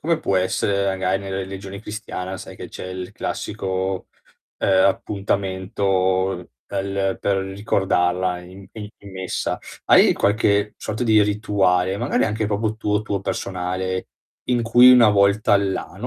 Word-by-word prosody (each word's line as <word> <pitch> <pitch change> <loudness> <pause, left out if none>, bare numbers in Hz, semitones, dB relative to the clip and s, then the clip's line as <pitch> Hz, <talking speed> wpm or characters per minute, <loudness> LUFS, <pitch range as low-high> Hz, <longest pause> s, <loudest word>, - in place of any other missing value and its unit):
come 165 0 0
può 100 -11 0
essere 100 +2 +1
magari 95 0 0
nella 95 -1 -4
religione 95 +1 -7
cristiana 100 -4 -6
sai - - -10
che - - -9
c'è - - -8
il 90 0 -6
classico, 95 0 -3 0.5
ehm, 95 -1 +3
appuntamento 95 -1 -1 0.2
pel 95 -1 -2
per 100 -1 +1
ricordarla 95 -2 0
in 95 +2 -13
in 105 -2 -7
in 100 - -13
messa. 95 -1 -3 0.3
Hai - - +6
qualche 100 0 +1
sorta 110 +3 -4
di 110 -3 +4
rituale, 100 -3 +1
magari 120 +6 +1
anche 110 0 -1
proprio 105 +1 -1
tuo, 105 -1 0
tuo 100 -2 -2
personale, 95 -1 -3 0.4
in 120 -1 +1
cui 120 +2 +7
una 120 -3 +7
volta 100 +1 +3
all'ano, 100 -1 -2
100 Hz, 140 wpm, -22 LUFS, 95-105 Hz, 0.5 s, cui